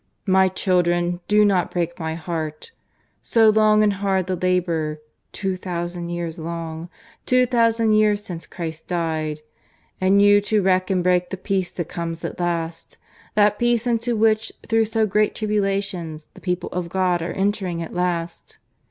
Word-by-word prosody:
"My 190 -1 +4
children, 175 -2 +1
do 210 0 +5
not 190 -4 +2
break 170 -1 -3
my 160 -1 -3
heart! 160 - -5 0.5
So 225 -2 +4
long 215 0 +4
and 205 -1 +3
hard 190 -1 0
the 185 0 -1
labour 170 -4 0 0.3
two 190 -2 -2
thousand 175 -1 -4
years 175 -1 -4
long 165 0 -5 0.4
two 255 0 +4
thousand 230 -2 +2
years 210 -1 +3
since 170 -4 -8
Christ 160 -2 -6
died; 160 -3 -2 0.6
and 190 +2 +4
you 205 0 +6
to 210 0 +1
wreck 185 0 +2
and 185 -2 +1
break 180 0 +2
the 190 - -5
peace 190 -1 -1
that 175 -4 -4
comes 165 -1 -5
at - - -6
last; 165 -1 -3 0.4
that 210 0 +3
peace 240 -1 +2
into 235 0 0
which 220 0 +2 0.2
through 225 0 +3
so 220 0 +1
great 210 +1 +1
tribulations 195 -7 -2
the - - -15
people 180 -1 -2
of 175 -1 -3
God 180 -1 +1
are 165 - -3
entering 190 -4 -1
at 165 - -9
last. 175 -1 -3
185 Hz, 160 wpm, -22 LUFS, 170-210 Hz, 0.6 s, you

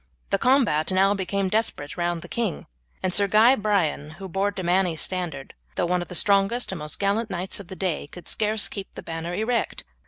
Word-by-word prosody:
The - - +2
combat 235 - +3
now 195 +2 +4
became 195 0 -1
desperate 185 -8 -1
round 175 -1 -1
the - - -9
king, 230 -7 -2 0.4
and 185 -1 0
Sir 200 0 +5
Guy 220 +6 +6
Brian, 195 - 0
who 195 - -7
bore 195 +3 0
De 195 -2 -5
Manny's 175 -2 +1
standard, 175 -7 -4 0.2
though - - +1
one 180 +1 +1
of 175 - -6
the 180 - -7
strongest 200 +6 +2
and 190 - -5
most 150 0 -2
gallant 205 +3 +1
knights 190 +1 -2
of 200 - -10
the 190 - -8
day, 180 -6 -2
could 180 +4 -12
scarce 215 0 +2
keep 200 -2 -8
the - - -8
banner 165 +1 -4
erect. 230 +4 -1
190 Hz, 210 wpm, -25 LUFS, 175-205 Hz, 0.4 s, Guy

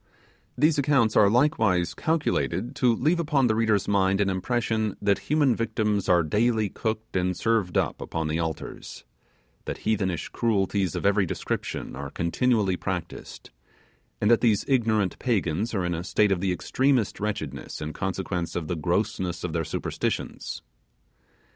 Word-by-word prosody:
These 150 +3 +3
accounts 135 -6 +2
are 100 - +6
likewise 110 - +2
calculated 150 -5 -1
to 120 -3 +3
leave 155 +9 +1
upon 150 -5 +2
the 110 - +3
reader's 110 -3 +1
mind 95 -1 +2
an 100 -1 +2
impression 110 +2 -1
that 100 -1 +2
human 145 -5 +3
victims 105 -3 -1
are 90 -2 +5
daily 110 +5 +1
cooked 110 0 -4
and 90 -1 0
served 110 -6 +1
up - - 0
upon 80 -1 -3
the 80 +2 -1
altars; 80 -2 -5 0.6
that - - -6
heathenish 95 -6 0
cruelties 100 -5 0
of - - -3
every 100 -1 +3
description - - -4
are 70 +1 -6
continually 95 - +1
practised; 90 -3 -6 0.7
and 105 - +3
that 120 - +5
these 110 -4 +2
ignorant 110 -7 +1
Pagans 105 -3 0
are 95 -3 0
in 90 - -1
a 85 +1 -3
state 105 +2 +2
of 90 -2 +1
the 95 -1 +1
extremest 130 +4 +1
wretchedness 105 0 -4
in 75 +1 -5
consequence 90 -2 -3
of 80 -3 -3
the 90 - -2
grossness 85 +1 -1
of 90 -3 -3
their 80 0 0
superstitions. - - -3
105 Hz, 155 wpm, -26 LUFS, 90-115 Hz, 0.7 s, are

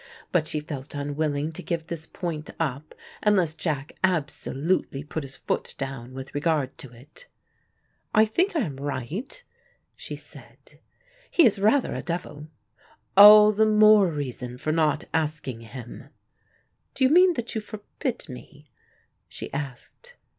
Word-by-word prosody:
But 160 -4 +1
she 155 - -1
felt 145 -2 -7
unwilling 145 +1 -2
to 160 - -8
give 165 -2 -3
this 160 -1 -7
point 160 -4 -5
up, 150 -1 -3 0.3
unless 190 -7 +3
Jack 150 -3 -3
absolutely 150 -3 -1
put 155 +2 -5
his 135 -1 -9
foot - - -3
down 130 -2 -6
with 130 0 -8
regard 145 -2 0
to 130 - -9
it. 130 - -15 0.8
"I 215 0 +5
think 350 - 0
I 315 - +2
am 145 - -4
right," 145 - -5 0.5
she - - -7
said. - - -14 0.5
"He 340 - +5
is 210 -4 +3
rather 220 +7 +2
a - - -4
devil." 170 -4 -5 0.7
"All 210 +1 +10
the 215 +1 +3
more 215 -2 +6
reason 130 -5 -5
for 155 - -2
not 155 -2 +1
asking 150 -7 -2
him." 120 +1 -10 0.9
"Do 265 - 0
you 260 - +5
mean 360 +1 +6
that 240 -3 -4
you 220 - -2
forbid 215 +3 -6
me?" 145 +1 -12 0.6
she - - -8
asked. 140 - -7
155 Hz, 145 wpm, -25 LUFS, 140-210 Hz, 0.9 s, All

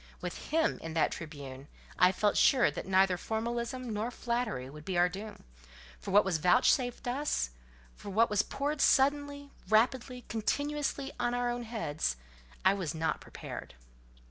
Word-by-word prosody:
With - - -6
him 320 +1 +1
in 165 0 -7
that 160 - +2
Tribune, 140 -4 -8 0.3
I 180 0 +7
felt 205 +2 +1
sure 255 - +5
that 150 - -6
neither 190 -1 +4
formalism 235 +4 -3
nor 215 +3 -1
flattery 235 - -2
would 150 +3 -11
be 185 +1 -2
our 175 +1 +5
doom; 205 +4 -8
but - - -28 0.6
for - - -5
what 205 +1 +5
was 180 -4 0
vouchsafed 245 - +3
us, 255 - -1 0.4
for - - -9
what 225 +4 +4
was 210 -1 +4
poured 285 +5 -2
suddenly, 285 +1 +2 0.2
rapidly, 245 +3 +2
continuously, 285 +4 -1
on 240 0 0
our 245 0 0
heads—I 145 - -2
own 200 - -1
I - - -6
was 165 -4 -3
not 160 0 -1
prepared. - - -8
215 Hz, 160 wpm, -31 LUFS, 170-250 Hz, 0.6 s, I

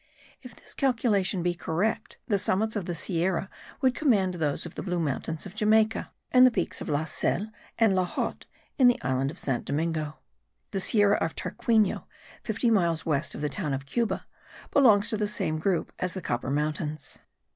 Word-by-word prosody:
If 250 -3 -11
this - - -9
calculation 215 -8 +1
be 175 0 +1
correct, 175 +5 -2
the 205 -5 +2
summits 215 +4 +1
of 200 -4 -2
the 175 - -3
Sierra 180 +2 0 0.3
would 260 -2 +3
command 205 -12 +2
those 155 -4 -1
of 170 - -8
the - - -5
Blue 180 -2 -2
Mountains 155 +2 -2
of 190 - -9
Jamaica, 220 0 +2 0.2
and 255 0 +7
the 255 - +9
peaks 235 - -2
of - - -5
La 150 +1 0
Selle 190 +6 -1 0.3
and 225 -4 +4
La 185 -1 +2
Hotte - - -4 0.3
in 255 - +7
the 245 - +4
island 130 +1 0
of - - -9
San 130 -3 -1
Domingo. 155 0 -2 0.5
The 195 - -2
Sierra 205 0 +3
of 165 - -2
Tarquino, 220 -4 +1 0.4
fifty 230 +2 0
miles 170 -6 +2
west 150 -4 0
of - - -6
the 150 - 0
town 150 -3 -2
of 135 +1 -6
Cuba, 230 - -1 0.5
belongs 230 -5 +5
to 220 - 0
the 210 0 0
same 155 -6 -1
group 180 +1 0
as 180 -2 -2
the 190 - -4
Copper 120 +2 -2
Mountains. 150 +1 -3
185 Hz, 190 wpm, -27 LUFS, 155-220 Hz, 0.5 s, the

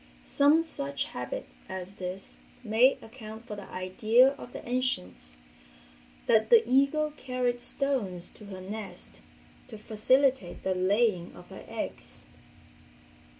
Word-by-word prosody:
Some 295 +3 +4
such 140 - -3
habit 125 0 -5 0.2
as 190 0 -6
this 185 0 -6 0.2
may 235 +4 +4
account 225 -1 -10
for 210 - -6
the 200 -1 -9
idea 215 +7 +4
of 275 -3 -9
the - - -9
ancients 240 - -2 0.9
that 220 -2 +4
the 465 -1 +7
eagle 280 +4 +3
carried 250 -4 -2
stones 240 -12 -1
to 210 - -14
her 190 -2 -8
nest 185 - -8 0.5
to 220 - -9
facilitate 240 0 +2
the 190 - +1
laying 185 0 +1
of - - -13
her - - -10
eggs. - - -6
220 Hz, 125 wpm, -29 LUFS, 185-260 Hz, 0.9 s, the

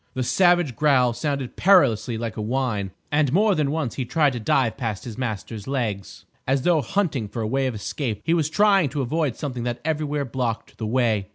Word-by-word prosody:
The 130 - -1
savage 175 -2 +3
growl 130 -3 +3
sounded 140 -1 -3
perilously 120 - +3
like 115 -1 -4
a 110 - -4
whine, 110 -4 -1 0.2
and 145 -2 +2
more 205 +6 +3
than 150 -5 0
once 150 -5 -2
he 130 - -3
tried 145 +2 +2
to 120 - -4
dive 115 +1 +1
past 115 -6 -4
his 115 -3 -7
master's 110 -3 -5
legs, 115 -8 -3 0.2
as 135 0 +1
though 170 -3 +3
hunting 145 - -1
for 115 +2 -4
a - - -1
way 135 +3 0
of 125 - -3
escape. 110 +1 -4
He 165 - +1
was 160 -3 +1
trying 195 -3 +3
to 140 +1 -2
avoid 150 0 -1
something 130 -5 -5
that 120 -1 -2
everywhere 150 -2 -1
blocked 120 -2 -4
the 110 - -3
way. 110 -4 +1
130 Hz, 205 wpm, -23 LUFS, 115-150 Hz, 0.2 s, savage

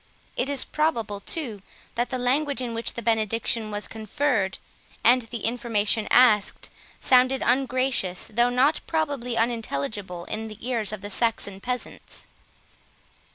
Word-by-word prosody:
It 260 - -1
is 280 -2 +2
probable, 230 -10 -1
too, 225 - -3 0.3
that 240 +1 -1
the 255 - -2
language 275 +3 0
in 245 -2 -2
which 230 +1 -1
the 235 - -5
benediction 225 0 0
was 205 0 -4
conferred, 220 -2 -1 0.5
and 250 +3 +6
the 230 -1 -6
information 225 -2 0
asked, 225 -5 +4 0.3
sounded 255 +1 +4
ungracious, 255 -7 +1
though 240 +3 +4
not 260 +5 +2
probably 285 -7 -1
unintelligible, 205 -5 -2
in 220 +1 -4
the 215 -1 -9
ears 230 -5 0
of 215 -2 -6
the 205 0 -6
Saxon 200 -3 0
peasants. 250 +1 -5
235 Hz, 135 wpm, -25 LUFS, 215-255 Hz, 0.5 s, and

